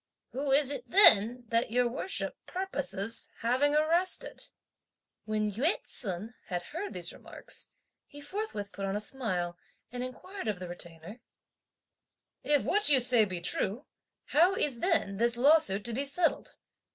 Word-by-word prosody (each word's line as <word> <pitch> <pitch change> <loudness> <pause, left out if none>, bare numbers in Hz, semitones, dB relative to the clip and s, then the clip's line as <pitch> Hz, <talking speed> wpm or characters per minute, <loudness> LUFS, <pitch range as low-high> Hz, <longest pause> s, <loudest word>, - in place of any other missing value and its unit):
Who 275 +1 -2
is 280 0 +4
it 285 - -5
then 245 - +6
that 230 +1 +1
your 245 +2 +2
Worship 270 +10 -2
purposes 225 - -3
having 260 +5 +2
arrested?" 340 +10 +1 0.8
When 215 -1 0
Yü 250 - +1
ts'un 205 +1 -5
had 175 -1 -3
heard 345 - -6
these - - 0
remarks, - - -4 0.4
he 290 - -12
forthwith 290 - -5
put 195 - -5
on 195 - -2
a - - 0
smile 185 -8 -1 0.3
and 245 0 -4
inquired 370 - -7
of 210 -3 -1
the 180 0 -7
Retainer, 175 +4 -8 1.2
"If 295 -1 +2
what 415 -1 +2
you 275 -3 +7
say 245 -3 +5
be 185 -3 -4
true, 210 - -2 0.4
how 350 +6 +4
is 275 -10 -1
then 325 - 0
this 235 +2 +2
lawsuit 245 -7 +4
to 235 - -2
be 275 +5 -2
settled? 325 +5 0
245 Hz, 150 wpm, -30 LUFS, 205-295 Hz, 1.2 s, you